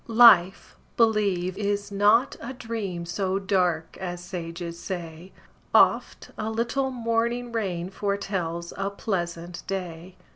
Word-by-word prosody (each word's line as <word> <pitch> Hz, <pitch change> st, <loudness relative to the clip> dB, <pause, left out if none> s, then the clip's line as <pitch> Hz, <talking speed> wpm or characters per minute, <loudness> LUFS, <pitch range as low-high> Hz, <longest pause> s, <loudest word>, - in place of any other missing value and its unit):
Life, 220 Hz, -6 st, +6 dB, 0.2 s
believe, 200 Hz, -5 st, +2 dB
is 205 Hz, 0 st, -1 dB
not 210 Hz, +6 st, +4 dB
a 250 Hz, +3 st, -5 dB
dream 220 Hz, -8 st, -4 dB
So 190 Hz, +2 st, -1 dB
dark 180 Hz, -5 st, 0 dB
as 175 Hz, -1 st, -5 dB
sages 170 Hz, -2 st, -6 dB
say; 175 Hz, -1 st, -6 dB, 0.4 s
Oft -, -, +3 dB
a 215 Hz, -, -2 dB
little 235 Hz, +4 st, 0 dB
morning 235 Hz, 0 st, -1 dB
rain 185 Hz, -6 st, -2 dB
Foretells 190 Hz, -4 st, -3 dB
a 195 Hz, 0 st, -1 dB
pleasant 175 Hz, -4 st, -4 dB
day. 180 Hz, -2 st, -5 dB
195 Hz, 115 wpm, -26 LUFS, 175-220 Hz, 0.4 s, Life